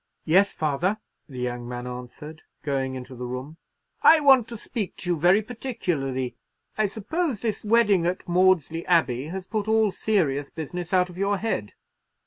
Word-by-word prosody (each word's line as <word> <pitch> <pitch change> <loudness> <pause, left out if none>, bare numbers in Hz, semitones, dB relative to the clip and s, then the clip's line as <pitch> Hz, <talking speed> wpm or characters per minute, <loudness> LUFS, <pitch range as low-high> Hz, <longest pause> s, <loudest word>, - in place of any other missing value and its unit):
"Yes, 190 +5 +4
father," 160 +7 0 0.3
the 130 - -10
young 120 -1 -4
man 120 0 -5
answered, 125 +6 -8 0.2
going 135 -2 -1
into 130 0 -8
the 125 0 -6
room. 130 +6 -6 0.4
"I 325 - +8
want 265 -6 +5
to 235 - -7
speak 210 -2 -5
to 180 - -3
you - - +2
very 180 +6 +4
particularly. 175 - -3 0.4
I 215 -1 +2
suppose 245 - -2
this 220 -3 -2
wedding 210 -5 +3
at 180 +1 -3
Maudesley 175 -2 +2
Abbey 140 -7 +2
has 185 +4 -6
put 215 +1 -3
all 220 -1 +3
serious 150 -11 0
business 170 +2 -6
out 180 -1 +2
of 175 - -11
your 200 +1 +1
head." 185 - -3
180 Hz, 165 wpm, -25 LUFS, 135-210 Hz, 0.4 s, I